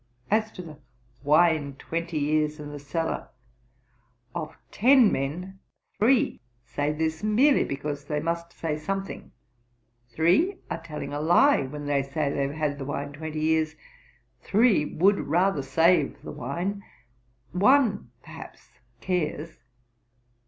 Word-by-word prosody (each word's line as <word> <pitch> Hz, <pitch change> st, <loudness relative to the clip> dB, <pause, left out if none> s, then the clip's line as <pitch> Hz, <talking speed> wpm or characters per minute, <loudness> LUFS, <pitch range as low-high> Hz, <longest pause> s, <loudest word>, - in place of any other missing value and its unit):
As 220 Hz, +1 st, +2 dB
to 180 Hz, -, -8 dB
the 155 Hz, -3 st, -11 dB, 0.4 s
wine 150 Hz, -2 st, +3 dB
twenty 165 Hz, +3 st, -4 dB
years 150 Hz, +1 st, 0 dB
in 145 Hz, 0 st, -7 dB
the 145 Hz, -, -7 dB
cellar, 160 Hz, +3 st, -3 dB, 1.0 s
of 160 Hz, -3 st, -5 dB
ten 250 Hz, 0 st, +5 dB
men, 180 Hz, +8 st, -3 dB, 0.4 s
three 260 Hz, +5 st, +3 dB, 0.2 s
say 145 Hz, +4 st, -1 dB
this, 160 Hz, +1 st, -2 dB
merely 250 Hz, +7 st, +4 dB
because 145 Hz, +1 st, -4 dB
they 150 Hz, 0 st, -2 dB
must 170 Hz, +2 st, -3 dB
say 155 Hz, -2 st, -3 dB
something; 195 Hz, +5 st, -5 dB, 0.8 s
three 180 Hz, -, +2 dB
are -, -, -3 dB
telling 150 Hz, -3 st, -6 dB
a 145 Hz, -, -2 dB
lie, 175 Hz, -, +4 dB
when 145 Hz, +2 st, -7 dB
they 145 Hz, -1 st, +1 dB
say 140 Hz, +1 st, -2 dB
they 140 Hz, -, -2 dB
have 140 Hz, -, -6 dB
had 150 Hz, -2 st, -2 dB
the 135 Hz, -, -5 dB
wine 145 Hz, 0 st, -4 dB
twenty 155 Hz, +1 st, -5 dB
years; 160 Hz, 0 st, +1 dB, 0.7 s
three 215 Hz, -6 st, +3 dB
would 195 Hz, +7 st, +2 dB
rather 175 Hz, +1 st, +1 dB
save 160 Hz, +3 st, +2 dB
the -, -, -7 dB
wine; 175 Hz, +11 st, -4 dB, 0.7 s
one, 205 Hz, -, +3 dB
perhaps, -, -, -13 dB, 0.2 s
cares. 165 Hz, -3 st, -2 dB
160 Hz, 130 wpm, -26 LUFS, 145-190 Hz, 1.0 s, ten